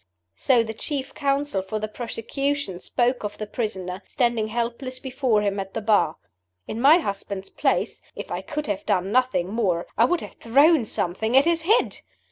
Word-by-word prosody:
So 245 -4 +3
the 220 -1 -5
chief 270 +4 -4
counsel 280 -7 0
for 205 +3 -4
the 215 0 -3
prosecution 240 0 -3
spoke 245 +4 0
of 210 0 -4
the 215 - -4
prisoner, 190 -4 -4
standing 235 -4 +1
helpless 240 +3 -3
before 255 -5 0
him 200 -1 0
at 195 0 -6
the - - 0
Bar. 205 -7 +3 0.5
In 225 - -4
my 290 +5 +8
husband's 200 - -4
place, - - 0
if - - -7
I - - -2
could 300 -1 -4
have 205 -5 -2
done 195 -1 +1
nothing 250 -7 +2
more, 195 -6 0
I 230 - +7
would 355 +5 +1
have - - -8
thrown 280 +3 +4
something 220 +6 0
at 275 - +6
his 335 -1 +2
head. 430 +9 +2
230 Hz, 180 wpm, -24 LUFS, 205-270 Hz, 0.5 s, my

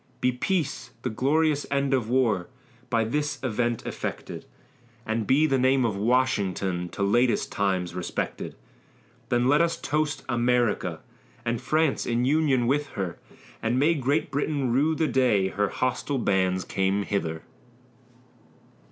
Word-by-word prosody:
Be 125 - +2
peace, 135 -1 -2
the 125 - -1
glorious 145 +5 +1
end 140 -1 +1
of 120 -4 0
war, 115 -8 +2 0.4
By 115 -3 +2
this 145 +6 -1
event 120 -1 -1
effected; - - -5 0.6
And 110 -1 -1
be 145 +4 +4
the 135 -4 +2
name 130 0 +3
of 110 -4 0
Washington 100 -6 0
To 100 - -3
latest 120 +5 +2
times 95 -3 0
respected; 90 0 -4 0.7
Then 120 +1 +2
let 145 +4 +4
us 165 0 +1
toast 150 -1 -1
America, 120 -8 +1 0.4
And 115 -1 -1
France 155 -2 +1
in 120 +1 +1
union 140 -3 +2
with 145 +4 +1
her; 95 -4 -4 0.4
And 115 +2 0
may 150 +5 +4
Great 145 +1 0
Britain 140 -2 0
rue 150 +5 +2
the 160 - +1
day 110 -9 +2
Her 105 +1 0
hostile 130 +2 -1
bands 95 -5 +1
came 95 +1 0
hither. 80 -6 -2
125 Hz, 140 wpm, -26 LUFS, 105-140 Hz, 0.7 s, be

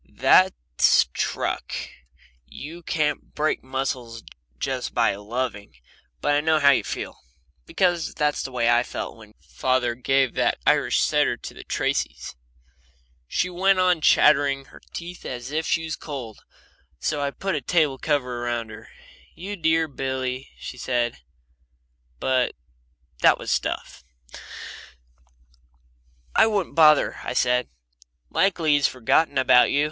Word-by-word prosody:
"That's 60 0 +4
truck. - - -2 0.7
You 160 - -9
can't 155 -3 -2
break 155 +1 0
muscles 130 -3 -4 0.3
just - - -3
by - - +3
loving. 105 - -4 0.5
But 145 - +1
I 145 - +3
know 160 +1 +3
how 140 -2 +6
you 135 - +2
feel, - - -6 0.5
because 175 -3 0
that's 150 -1 0
the 135 - -6
way 120 -2 0
I 120 0 +5
felt - - -6
when 110 -1 -16
father 120 - -1
gave 135 +1 +1
that - - +1
Irish - - +3
setter - - +2
to - - -9
the - - -11
Tracys." - - -2 0.9
She 180 - 0
went 190 +2 +2
on 180 -3 +3
chattering 140 -3 +4
her - - -15
teeth 175 +1 -8
as 125 +1 -6
if 160 +1 -1
she 165 - +1
was 160 -1 -3
cold, 130 -8 -8 0.6
so 150 -2 -2
I 140 - 0
put 195 +7 -4
the 150 - -1
table 150 -2 +1
cover 125 -5 -1
around 120 -2 -3
her. 110 - -12 0.5
"You 200 +4 -6
dear 160 -2 +2
Billy," 130 -2 -4
she 125 - -8
said. 120 -2 -1 1.0
But 130 -1 +1 0.7
that - - +6
was - - -4
stuff. - - -3 2.3
"I - - +6
wouldn't 205 -4 -1
bother," 155 -2 +5
I - - -3
said. 125 0 +1 0.6
"Likely 170 -5 +2
he's 145 -1 +4
forgotten 135 +4 +1
about 130 -1 +5
you. 140 - +1
135 Hz, 135 wpm, -24 LUFS, 125-160 Hz, 2.3 s, how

